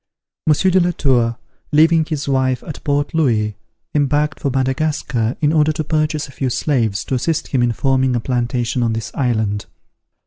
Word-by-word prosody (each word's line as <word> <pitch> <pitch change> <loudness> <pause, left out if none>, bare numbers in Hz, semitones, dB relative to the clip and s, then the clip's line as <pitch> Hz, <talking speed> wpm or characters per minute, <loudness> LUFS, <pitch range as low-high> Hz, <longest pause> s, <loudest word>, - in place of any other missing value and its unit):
Monsieur 155 +5 +3
de 185 - +4
la 175 0 +2
Tour, 120 -6 +1 0.3
leaving 160 +1 +4
his 150 -3 -4
wife 130 -2 +1
at 150 - -8
Port 145 0 0
Louis, 110 -10 +1 0.4
embarked 145 +1 +1
for 140 - -1
Madagascar, 130 -3 -1
in 150 0 +2
order 155 -1 +3
to 155 - -2
purchase 155 0 -1
a - - -13
few 130 -1 -2
slaves, 120 -7 0
to - - -4
assist 160 +5 -1
him 130 - +1
in 120 0 +2
forming 130 +1 +1
a - - +1
plantation 120 0 -1
on 115 -1 +1
this 110 0 -4
island. 110 -6 -1
135 Hz, 175 wpm, -19 LUFS, 120-150 Hz, 0.4 s, de